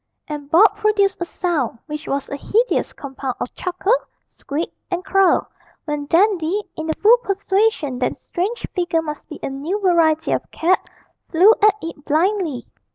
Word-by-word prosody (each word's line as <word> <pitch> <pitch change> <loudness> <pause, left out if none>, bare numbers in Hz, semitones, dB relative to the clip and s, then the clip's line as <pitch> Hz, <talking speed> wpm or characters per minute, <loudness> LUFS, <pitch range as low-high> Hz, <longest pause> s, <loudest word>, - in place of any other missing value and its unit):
And 295 -2 -6
Bob 410 +6 +5
produced 415 -3 +1
a - - 0
sound 335 -10 -2
which 300 0 -7
was 275 0 -2
a - - -5
hideous 450 - 0
compound 270 -2 -6
of - - -4
chuckle, 370 +4 0 0.3
squeak, 300 +4 -5 0.2
and 360 +1 -3
crow, 390 -3 +3 0.4
when 295 -2 -3
Dandy, 375 +2 +2
in 315 - -5
the 315 - +1
full 455 +4 +8
persuasion 395 - 0
that 250 - +1
the - - -9
strange 395 +7 -3
figure 345 -3 0
must 300 -1 -7
be 305 - -8
a - - -2
new 305 +10 -3
variety 330 -5 +2
of - - -1
cat, 360 +3 0 0.4
flew 370 +7 +6
at 420 -1 +6
it 325 -3 -7
blindly. 320 -2 0
345 Hz, 165 wpm, -20 LUFS, 300-395 Hz, 0.4 s, full